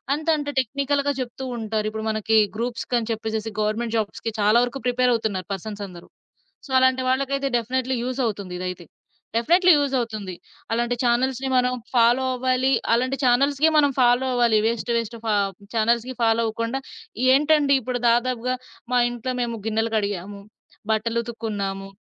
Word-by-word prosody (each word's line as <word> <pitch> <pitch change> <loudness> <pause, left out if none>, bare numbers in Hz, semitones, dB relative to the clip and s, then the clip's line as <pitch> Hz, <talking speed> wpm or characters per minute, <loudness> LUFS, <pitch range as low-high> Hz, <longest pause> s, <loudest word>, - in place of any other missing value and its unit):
అంత 310 +2 -7
అంట 290 -1 -5
టెక్ని‌కల్‌గా 280 +3 -1
జెప్తూ 255 +1 -5
ఉంటారు. 220 -1 -2
ఇప్పుడు 220 0 -5
మనకి 220 0 +1 0.2
గ్రూప్స్‌కని 235 0 -2
చెప్పేసేసి 220 0 -3
గవర్నమెంట్ 225 +2 -1
జాబ్స్‌కి 220 +1 -3
చాలా 210 +3 +4
వరుకు 245 +2 -3
ప్రిపేరవుతున్నారు 230 -7 0
పర్‌స‌న్సందరు. 195 -3 -7 0.6
సో, 280 - -14
అలాంటి 260 0 +3
వాళ్ళకైతే 275 +1 0
డెఫినైట్లీ 255 +2 -1
యూజవుతుంది 225 -8 -2
ఇదైతే. 180 -1 -5 0.5
డెఫినేట్లీ 350 +10 +4
యూజవుతుంది. 230 -9 -2 0.4
అలాంటి 240 +1 0
చానెల్స్‌ని 255 +2 +1
మనం 250 0 +2 0.2
ఫాలో 240 +2 +4
అవ్వాలి. 255 +1 +1 0.2
అలాంటి 255 +3 +1
చానెల్స్‌కే 275 +5 +3
మనం 285 -2 +4
ఫాలో 245 +1 +4
అవ్వాలి. 235 -3 +3
వేస్ట్‌, 230 +1 -1
వేస్ట్‌ 230 0 -4
ఫ - - -3 0.5
చానెల్స్‌కి 235 +3 +1
ఫాలో 230 0 +3
అవ్వకుండా, 230 +4 -2 0.5
ఏంటండిప్పుడు 280 -4 +2
దాదాపుగా 250 +1 +1 0.4
మా 245 - +4
ఇంట్లో 240 +1 -4
మేము 235 -1 -2
గిన్నెలు 225 +1 0
కడిగాము, 200 -1 -3 0.5
బట్టలుతుకున్నాము, 220 -3 -2
235 Hz, 130 wpm, -23 LUFS, 220-260 Hz, 0.6 s, చాలా